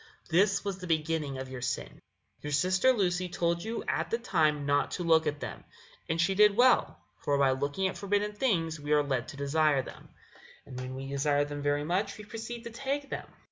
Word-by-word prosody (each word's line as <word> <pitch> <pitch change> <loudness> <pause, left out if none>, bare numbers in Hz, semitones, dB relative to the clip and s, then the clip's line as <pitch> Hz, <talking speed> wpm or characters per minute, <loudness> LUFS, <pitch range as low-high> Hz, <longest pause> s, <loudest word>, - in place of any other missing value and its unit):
This 195 +4 +3
was 195 -2 -3
the 180 - -7
beginning 155 -3 -1
of 130 0 -5
your 130 -1 -7
sin. 125 0 -4 0.4
Your 150 - -5
sister 185 - +3
Lucy 185 -6 0
told 170 0 0
you 225 +2 -4
at - - -1
the 230 - +1
time 155 -10 +1
not 145 0 +2
to 180 - -3
look 160 -1 +4
at 145 -1 -2
them, - - -6 0.5
and 160 +1 0
she 175 +3 +3
did 210 +1 +5
well; 250 - +4 0.2
for 145 -1 0
by 135 -1 +4
looking 140 +8 -1
at 190 - -5
forbidden 205 +1 0
things 170 - 0
we 145 +1 -1
are 150 -1 +4
led 130 -3 -1
to 140 - -9
desire 140 -1 +2
them, - - -12 0.6
and 130 -2 -8
when 130 0 -6
we 135 +1 -6
desire 145 +1 +1
them 145 0 -6
very 145 0 +1
much 190 +6 -1
we 210 - -10
proceed 225 +2 -7
to 235 - -7
take 275 +4 -3
them. - - -4
165 Hz, 215 wpm, -30 LUFS, 145-200 Hz, 0.6 s, did